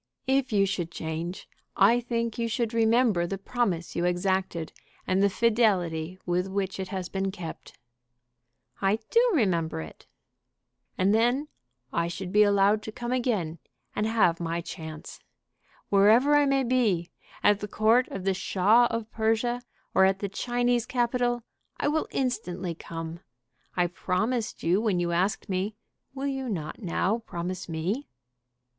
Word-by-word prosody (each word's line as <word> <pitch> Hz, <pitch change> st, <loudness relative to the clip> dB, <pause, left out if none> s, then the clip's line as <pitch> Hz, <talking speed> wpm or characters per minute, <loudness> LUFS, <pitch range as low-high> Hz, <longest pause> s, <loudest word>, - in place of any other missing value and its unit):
"If 265 Hz, -1 st, +1 dB
you 200 Hz, -2 st, +4 dB
should 185 Hz, -4 st, -2 dB
change, 165 Hz, +3 st, -5 dB, 0.3 s
I 230 Hz, +5 st, +6 dB
think 235 Hz, -1 st, -2 dB
you 230 Hz, -, 0 dB
should 230 Hz, 0 st, -1 dB
remember 225 Hz, -5 st, +3 dB
the 195 Hz, -, -3 dB
promise 195 Hz, -5 st, -2 dB
you 170 Hz, -, 0 dB
exacted 180 Hz, -2 st, 0 dB, 0.3 s
and 185 Hz, +1 st, +1 dB
the 200 Hz, -, +5 dB
fidelity 185 Hz, -7 st, +1 dB
with 180 Hz, +1 st, 0 dB
which 195 Hz, 0 st, -2 dB
it 190 Hz, -, -3 dB
has 185 Hz, -2 st, -4 dB
been 195 Hz, +1 st, -2 dB
kept." 175 Hz, -4 st, -8 dB, 1.0 s
"I 195 Hz, +2 st, +3 dB
do 485 Hz, +2 st, +5 dB
remember 180 Hz, -, +1 dB
it." 80 Hz, -1 st, -10 dB, 0.9 s
"And 190 Hz, +2 st, +3 dB
then 245 Hz, +7 st, +2 dB, 0.4 s
I 170 Hz, 0 st, +1 dB
should 180 Hz, +1 st, -5 dB
be 210 Hz, +1 st, +5 dB
allowed 205 Hz, +1 st, +4 dB
to 220 Hz, -, -7 dB
come 240 Hz, +2 st, -5 dB
again 210 Hz, -11 st, -1 dB, 0.4 s
and 210 Hz, -, 0 dB
have 205 Hz, -7 st, +3 dB
my 170 Hz, 0 st, -2 dB
chance. 160 Hz, -2 st, -8 dB, 0.7 s
Wherever 220 Hz, +9 st, +5 dB
I 290 Hz, -1 st, +4 dB
may 275 Hz, -1 st, +2 dB
be, 225 Hz, -9 st, +1 dB, 0.3 s
at 205 Hz, -1 st, +5 dB
the 210 Hz, -, -4 dB
court 225 Hz, +5 st, +3 dB
of 195 Hz, -, -6 dB
the 195 Hz, 0 st, +2 dB
Shah 205 Hz, +6 st, +3 dB
of 230 Hz, -1 st, -4 dB
Persia 225 Hz, +2 st, 0 dB, 0.3 s
or 190 Hz, -, +6 dB
at 190 Hz, 0 st, +3 dB
the 200 Hz, 0 st, -3 dB
Chinese 245 Hz, +2 st, 0 dB
capital, 240 Hz, -1 st, 0 dB, 0.3 s
I -, -, -1 dB
will 310 Hz, +2 st, +1 dB
instantly 190 Hz, -9 st, -2 dB
come. 165 Hz, 0 st, -7 dB, 0.6 s
I 175 Hz, -, +4 dB
promised 190 Hz, +7 st, -2 dB
you 180 Hz, +5 st, +3 dB
when 210 Hz, -6 st, +1 dB
you 175 Hz, 0 st, 0 dB
asked 190 Hz, +4 st, 0 dB
me. 195 Hz, +2 st, -2 dB, 0.4 s
Will 270 Hz, +1 st, -3 dB
you 270 Hz, -2 st, -2 dB
not 165 Hz, -1 st, -4 dB
now 195 Hz, +4 st, 0 dB
promise 180 Hz, -4 st, -5 dB
me?" 180 Hz, -, -2 dB
200 Hz, 150 wpm, -27 LUFS, 180-235 Hz, 1.0 s, I